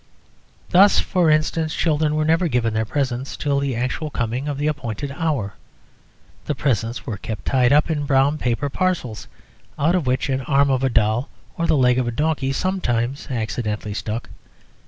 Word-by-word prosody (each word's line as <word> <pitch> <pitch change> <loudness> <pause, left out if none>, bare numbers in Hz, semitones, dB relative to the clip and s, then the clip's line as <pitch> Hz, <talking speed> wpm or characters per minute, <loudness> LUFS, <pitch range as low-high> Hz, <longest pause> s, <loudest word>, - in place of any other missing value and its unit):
Thus, 195 +2 +6
for 180 -4 +1
instance, 155 +1 +1
children 155 -2 +1
were 155 0 +1
never 165 +3 +2
given 120 -5 0
their 110 0 0
presents 130 +1 -2
until 140 -2 0
the 140 -3 -1
actual 130 +6 -2
coming 125 +1 -2
of 145 -2 -2
the 145 - -2
appointed 140 -3 -3
hour. 140 - -2 0.9
The 150 - -1
presents 120 -3 -1
were 110 -6 -4
kept 105 0 -6
tied 125 -2 +3
up 150 +1 +4
in 145 -2 -2
brown 140 +2 +3
paper 125 +3 0
parcels, 140 -8 -2 0.5
out 160 +5 +2
of 175 -7 0
which 125 +1 +1
an 135 -1 -1
arm 140 +1 +2
of 130 0 +1
a 135 - +3
doll 115 +2 +1 0.3
or 170 - -1
the 155 - +3
leg 125 -1 +4
of 125 - 0
a - - -1
donkey 145 +1 0
sometimes 135 -7 -1
accidentally 110 -3 -3
stuck. 110 +2 -4
135 Hz, 175 wpm, -21 LUFS, 120-155 Hz, 0.9 s, Thus